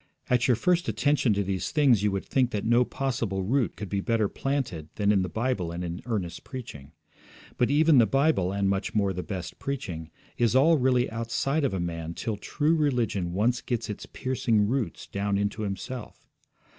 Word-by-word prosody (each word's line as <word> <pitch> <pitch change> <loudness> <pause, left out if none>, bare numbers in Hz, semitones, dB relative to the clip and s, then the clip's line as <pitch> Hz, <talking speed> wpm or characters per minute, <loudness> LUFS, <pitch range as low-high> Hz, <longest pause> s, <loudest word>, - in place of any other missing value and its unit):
At 125 -1 +3
your 125 - +4
first 175 +9 +1
attention 145 -5 +2
to 100 - +1
these 95 -1 -2
things 140 -8 +4
you 105 - +2
would 100 -1 -3
think 130 -2 +2
that 105 -4 -3
no 120 +2 +4
possible 115 -8 -2
root 120 +5 +1
could 105 - -6
be 100 +1 -1
better 110 0 +1
planted 120 - -3
than 105 -1 +2
in 100 -2 +3
the 90 - -2
Bible 110 -5 -1
and 85 +1 -4
in 85 0 -5
earnest 90 -8 -3
preaching. 75 - -9 0.6
But 125 - +2
even 150 0 +5
the 115 - +5
Bible, 135 - +2
and, 100 0 0
much 100 +3 -1
more, 100 -2 +2
the 90 - -3
best 90 -4 -6
preaching, 90 - -4 0.3
is 120 0 +3
all 155 +4 +5
really 125 -1 +3
outside 115 +6 -1
of 130 -8 +1
a - - -2
man 85 -1 -4
till 110 -3 -3
true 150 +9 0
religion 120 - 0
once 120 +6 +1
gets 120 -3 -2
its 105 - -8
piercing 115 -5 0
roots 125 0 -2
down 100 0 -1
into 100 +1 -1
himself. 105 +4 -6
110 Hz, 195 wpm, -27 LUFS, 95-130 Hz, 0.6 s, even